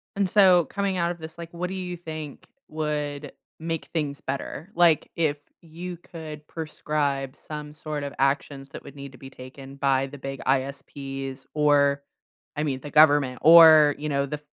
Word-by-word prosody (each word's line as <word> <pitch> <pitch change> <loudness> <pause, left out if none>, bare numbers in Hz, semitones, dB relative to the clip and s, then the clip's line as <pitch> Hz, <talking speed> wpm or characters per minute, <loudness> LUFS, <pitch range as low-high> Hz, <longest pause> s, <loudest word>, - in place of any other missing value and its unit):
And 200 -2 0
so, 185 -4 +5
coming 200 +1 -2
out 170 0 0
of 175 - -8
this, 160 0 -10
like, 170 -1 -8
what 180 +1 -3
do 190 - -6
you 180 -1 -4
think 155 -4 -8 0.2
would 150 -2 -3 0.3
make 165 -2 -4
things 145 -4 -2
better? 140 +5 -5
Like, 170 -3 +3
if 155 -3 0 0.2
you 175 +2 -8
could 155 -3 -10
prescribe 145 -4 -3
some 150 -1 -8
sort 150 -1 -5
of 140 - -5
actions 135 0 -1
that - - -10
would 140 - -12
need 140 -1 -9
to 130 - -15
be 135 - -11
taken 135 +1 -12
by 135 -1 +1
the 145 +1 -10
big 135 0 -6
ISPs 135 0 -3
or, 145 -2 +3 0.5
I 150 - -1
mean, 135 -4 -2
the 145 - -8
government, 145 -4 +4
or, 155 -2 +8
you 150 +1 -4
know, 140 -1 0
the 150 +1 -5
150 Hz, 180 wpm, -25 LUFS, 140-160 Hz, 0.5 s, or